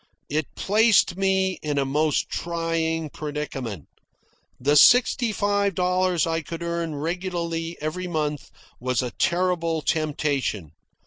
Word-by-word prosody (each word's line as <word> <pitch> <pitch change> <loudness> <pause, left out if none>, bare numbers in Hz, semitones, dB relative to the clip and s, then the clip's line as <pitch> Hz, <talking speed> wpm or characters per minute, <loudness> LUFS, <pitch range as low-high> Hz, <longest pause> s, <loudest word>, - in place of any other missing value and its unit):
It 155 0 0
placed 210 -3 +3
me 190 -1 +1
in 150 -2 -2
a 140 - +2
most 150 +2 +1
trying 165 -2 -2
predicament. 135 - -5 0.7
The 145 +4 +2
sixty 245 - +5
five 205 -2 0
dollars 180 -1 +1
I 165 0 -1
could 165 +2 -7
earn 170 -2 -2
regularly 170 +1 -3
every 170 +4 -3
month 150 -4 -2 0.3
was 125 +1 0
a 125 - -3
terrible 170 -3 +1
temptation. 140 - -1
165 Hz, 120 wpm, -24 LUFS, 150-180 Hz, 0.7 s, sixty